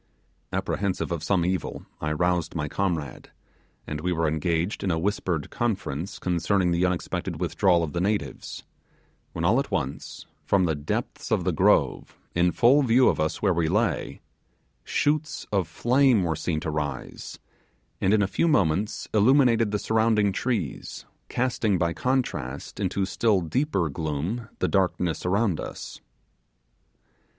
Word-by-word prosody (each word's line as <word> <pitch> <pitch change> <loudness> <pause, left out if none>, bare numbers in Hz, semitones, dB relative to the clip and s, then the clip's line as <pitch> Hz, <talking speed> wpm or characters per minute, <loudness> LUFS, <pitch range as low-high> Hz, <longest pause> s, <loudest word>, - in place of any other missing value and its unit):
Apprehensive 95 -2 -2
of 85 -3 -2
some 85 +1 +1
evil, 90 -3 -2 0.2
I 75 - -1
roused 90 +1 0
my 75 -2 -1
comrade, 80 -6 -3 0.6
and 75 0 -5
we 90 +2 -1
were 80 -2 +1
engaged 80 +4 -1
in 95 - 0
a 80 - +1
whispered 90 -3 -1
conference 100 -6 -2
concerning 90 +1 +1
the 85 +2 +2
unexpected 90 -1 -3
withdrawal 90 -3 +2
of 75 - -4
the 85 - -1
natives 100 +2 -2 0.7
when - - -2
all - - +4
at - - -2
once, 65 +2 -4 0.2
from 95 -2 +2
the 80 - +1
depths 75 0 -4
of - - +2
the - - +1
grove, - - +2 0.2
in 90 +1 +3
full 125 +9 +5
view 125 0 +5
of - - -1
us 80 +5 -1
where 95 -3 +4
we 85 -1 +1
lay, 105 +4 0 0.6
shoots 150 - 0
of 95 -5 +1
flame 125 - +3
were 80 -2 0
seen 80 +1 -2
to 80 - -3
rise, 75 -3 -5 0.6
and 95 - +3
in 105 -1 +4
a - - +1
few 165 - +1
moments 100 - +1
illuminated 115 0 +4
the 105 - 0
surrounding 110 -1 +2
trees, 100 - -3 0.2
casting, 120 -5 0
by 85 -1 0
contrast, 75 - -2
into 100 0 0
still 100 +1 +2
deeper 95 - 0
gloom 80 - -3
the - - 0
darkness 90 -4 0
around 100 -2 +1
us. - - -7
90 Hz, 150 wpm, -26 LUFS, 80-110 Hz, 0.7 s, full